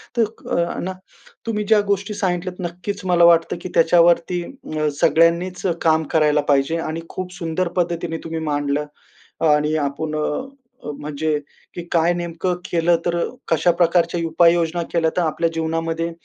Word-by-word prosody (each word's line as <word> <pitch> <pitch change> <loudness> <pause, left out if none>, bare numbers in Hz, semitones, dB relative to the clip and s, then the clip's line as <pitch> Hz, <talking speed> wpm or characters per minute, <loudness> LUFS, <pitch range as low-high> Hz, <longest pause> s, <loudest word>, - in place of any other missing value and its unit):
तर 235 - +3 0.3
अ, 170 0 0
ना, 190 +1 -3 0.5
तुम्ही 215 -2 -1
ज्या 215 +1 +4
गोष्टी 200 +1 0
सांगितल्यात 185 -2 -2
नक्कीच 185 +4 -6
मला 175 -2 +3
वाटतं 170 0 +4
की 185 - -6
त्याच्यावरती 170 +1 +4
अ, 155 - -4
सगळ्यांनीच 170 +3 +3 0.2
काम 160 -1 +3
करायला 150 -2 +3
पाहिजे 140 +3 +2
आणि 165 0 -4
खूप 185 -1 -6
सुंदर 175 0 -2
पद्धतीने 170 -1 -1
तुम्ही 165 0 -4
मांडलं 145 -1 -1 0.6
आणि 150 +1 +3
आपण 150 +1 -2
अ, 155 0 0 0.6
अ, - - -4
म्हणजे, 150 +1 -2 0.4
की 175 - -5
काय 170 +1 +3
नेमकं 175 +1 -2
केलं? 170 0 +2
तर 175 -1 0 0.3
कशा 165 +2 +3
प्रकारच्या 170 0 +2
उपाययोजना 170 +1 +3
केल्या 165 -2 +2
तर - - +3
आपल्या 165 0 0
जीवनामध्ये 165 +1 -2
170 Hz, 150 wpm, -21 LUFS, 160-175 Hz, 0.6 s, ज्या